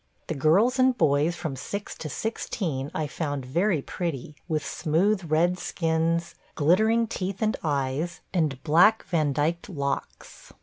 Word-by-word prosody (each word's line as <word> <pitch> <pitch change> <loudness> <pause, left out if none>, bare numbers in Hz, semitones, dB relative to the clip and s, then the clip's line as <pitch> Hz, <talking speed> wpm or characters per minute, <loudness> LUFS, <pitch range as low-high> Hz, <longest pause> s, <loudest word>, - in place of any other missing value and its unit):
The - - -3
girls 190 - +3
and 255 -1 +4
boys 150 +4 +2
from 155 -6 -4
six 200 +10 -5
to 155 - -5
sixteen 160 -8 -3
I 155 - -2
found 145 -2 -3
very 165 +3 +1
pretty, 155 -4 -4
with 155 -4 -1
smooth 175 +3 0
red 175 +4 +2
skins, 165 0 0 0.2
glittering 220 +9 +3
teeth 195 -3 -4
and 215 - +1
eyes, 145 +3 -1
and 150 -7 0
black 175 +8 +5
Vandyked 155 +2 0
locks. 140 -6 -5
165 Hz, 135 wpm, -26 LUFS, 145-185 Hz, 0.2 s, black